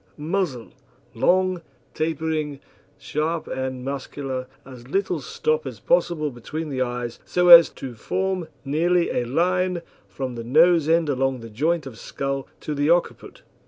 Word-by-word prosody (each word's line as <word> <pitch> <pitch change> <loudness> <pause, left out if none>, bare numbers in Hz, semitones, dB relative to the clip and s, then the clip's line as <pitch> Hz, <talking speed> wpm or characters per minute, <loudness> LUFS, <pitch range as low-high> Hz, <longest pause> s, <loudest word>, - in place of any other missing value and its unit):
MUZZLE 155 - -2 0.4
Long, 185 +8 +2 0.3
tapering, 155 -2 -2 0.4
sharp 160 +2 -2
and 130 -1 -4
muscular, 135 -1 -4 0.2
as 125 -2 -12
little 195 +8 -1
stop 465 +1 -1
as - - -7
possible 170 - +1
between 150 +6 -6
the 130 -2 -2
eyes, 120 -1 -3
so 180 0 +1
as 170 -2 +11
to 130 -2 -8
form 185 - -2 0.2
nearly 170 +5 +2
a 120 - -1
line 180 +6 0 0.2
from 130 -2 -5
the 115 -1 -6
nose 160 +5 +4
end 165 -1 +3
along 135 -2 0
the 115 -1 -10
joint 155 +7 0
of 125 -5 -9
skull 135 0 -4
to 150 - -4
the 145 +1 0
occiput. 175 +1 0
150 Hz, 145 wpm, -23 LUFS, 130-170 Hz, 0.4 s, as